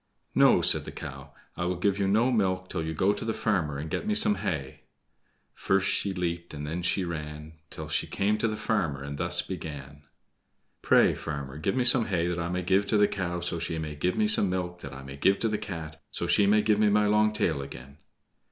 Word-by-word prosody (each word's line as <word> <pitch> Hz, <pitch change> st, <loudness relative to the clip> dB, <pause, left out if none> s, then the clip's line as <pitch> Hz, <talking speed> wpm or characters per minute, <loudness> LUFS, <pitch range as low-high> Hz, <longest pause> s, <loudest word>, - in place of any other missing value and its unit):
"No," -, -, +5 dB
said -, -, +3 dB
the -, -, -7 dB
cow, 70 Hz, +1 st, -9 dB, 0.2 s
"I 85 Hz, -, -3 dB
will 90 Hz, +1 st, 0 dB
give 100 Hz, +3 st, 0 dB
you 100 Hz, -, +1 dB
no 115 Hz, +6 st, +3 dB
milk 95 Hz, -5 st, 0 dB
till 85 Hz, -3 st, -2 dB
you 80 Hz, -, -3 dB
go 95 Hz, +6 st, +2 dB
to 105 Hz, -, -6 dB
the 115 Hz, -1 st, -2 dB
farmer 85 Hz, -10 st, 0 dB
and 75 Hz, +3 st, -5 dB
get 205 Hz, -, -3 dB
me 215 Hz, -, +1 dB
some 220 Hz, -1 st, +4 dB
hay." 75 Hz, -, -4 dB, 0.7 s
First 95 Hz, 0 st, +1 dB
she 100 Hz, -, 0 dB
leaped, 85 Hz, -3 st, -3 dB
and 75 Hz, 0 st, -5 dB
then 80 Hz, +4 st, -3 dB
she 90 Hz, +2 st, +1 dB
ran, 75 Hz, -1 st, -7 dB
Till -, -, -7 dB
she -, -, -1 dB
came 105 Hz, +2 st, 0 dB
to 115 Hz, -, +1 dB
the 110 Hz, -, -2 dB
farmer, 80 Hz, -13 st, -1 dB
and 70 Hz, 0 st, -6 dB
thus 90 Hz, 0 st, +3 dB
began: 75 Hz, -5 st, -7 dB, 0.8 s
"Pray, -, -, +4 dB
farmer, 70 Hz, -2 st, -6 dB
give 95 Hz, +5 st, -1 dB
me 130 Hz, -, +2 dB
some 120 Hz, -1 st, +5 dB
hay 85 Hz, -4 st, 0 dB
that 90 Hz, 0 st, -2 dB
I 85 Hz, 0 st, -2 dB
may 90 Hz, +1 st, -2 dB
give 95 Hz, +3 st, +2 dB
to 110 Hz, -, +2 dB
the 105 Hz, 0 st, +5 dB
cow, 90 Hz, -4 st, -3 dB
so 85 Hz, -1 st, -2 dB
she 80 Hz, 0 st, -2 dB
may 80 Hz, -1 st, -4 dB
give 90 Hz, +5 st, -1 dB
me 110 Hz, -, +2 dB
some 105 Hz, -2 st, +4 dB
milk 90 Hz, -1 st, -3 dB
that 70 Hz, -, -8 dB
I 70 Hz, 0 st, -9 dB
may 70 Hz, 0 st, -9 dB
give 95 Hz, +7 st, +3 dB
to 115 Hz, -, -1 dB
the 105 Hz, -1 st, -1 dB
Cat, 80 Hz, -5 st, -7 dB
so -, -, -4 dB
she 100 Hz, -, +3 dB
may 105 Hz, +1 st, +4 dB
give 105 Hz, -1 st, +2 dB
me 105 Hz, -1 st, +4 dB
my 105 Hz, +1 st, +3 dB
long 105 Hz, +1 st, +3 dB
tail 90 Hz, -9 st, 0 dB
again." 70 Hz, +1 st, -10 dB
90 Hz, 235 wpm, -27 LUFS, 75-105 Hz, 0.8 s, No